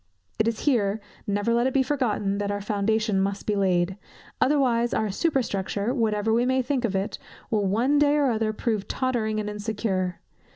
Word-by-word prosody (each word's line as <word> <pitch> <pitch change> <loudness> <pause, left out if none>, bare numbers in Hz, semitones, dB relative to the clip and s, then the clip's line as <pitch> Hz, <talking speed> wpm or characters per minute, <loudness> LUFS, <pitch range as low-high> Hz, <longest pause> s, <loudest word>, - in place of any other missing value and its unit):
It 220 - +3
is 230 -1 -1
here, 220 -7 +1 0.3
never 205 +3 +1
let 240 +2 +3
it 265 - -3
be 270 - +4
forgotten, 215 -8 0
that 205 0 -1
our 205 0 -1
foundation 210 0 0
must 200 +1 -2
be 210 - 0
laid; 185 -1 +1 0.4
otherwise 245 -4 +2
our 215 -2 0
superstructure, 215 - -1
whatever 220 -3 +1
we 235 +2 +3
may 260 +1 +2
think 260 -2 0
of 200 -4 -2
it, 195 +1 -2 0.3
will 210 -3 +1
one 245 +9 +2
day 295 0 +4
or 285 -4 +3
other 220 -1 0
prove 215 -2 -2
tottering 230 -5 -1
and 210 - -3
insecure. 205 -3 -2
220 Hz, 180 wpm, -25 LUFS, 200-245 Hz, 0.4 s, be